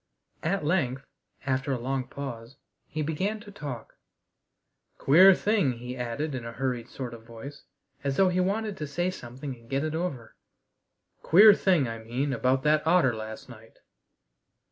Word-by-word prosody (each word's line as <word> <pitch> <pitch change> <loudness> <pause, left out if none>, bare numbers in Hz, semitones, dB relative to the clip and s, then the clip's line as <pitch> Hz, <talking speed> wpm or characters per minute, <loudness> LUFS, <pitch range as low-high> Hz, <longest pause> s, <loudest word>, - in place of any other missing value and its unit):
At 165 -1 -1
length, 140 -6 0 0.4
after 135 +1 0
a - - -1
long 130 +1 -2
pause, 130 -3 -7 0.3
he 155 0 -3
began 190 +8 -2
to 205 -1 -12
talk. 140 - -8 1.0
"Queer 185 +7 +7
thing," 200 - +1
he 125 +1 -7
added 125 +5 -3
in 125 -2 -4
a 115 0 -7
hurried 125 -2 -3
sort 125 -3 -6
of 115 -1 -11
voice, 120 +5 -10 0.4
as 140 -1 -1
though 190 -1 +5
he 180 0 0
wanted 205 +2 -1
to 150 - -4
say 175 +6 -1
something 130 -2 -7
and 115 -1 -20
get 135 +1 0
it 155 0 -2
over. 160 -9 -4 0.9
"Queer 205 +5 +8
thing, 180 -9 +2
I 115 0 -5
mean, 125 +5 -2
about 130 +2 +1
that 150 0 +3
otter 165 -7 +4
last 110 0 -7
night." 115 -2 -14
135 Hz, 165 wpm, -27 LUFS, 120-170 Hz, 1.0 s, Queer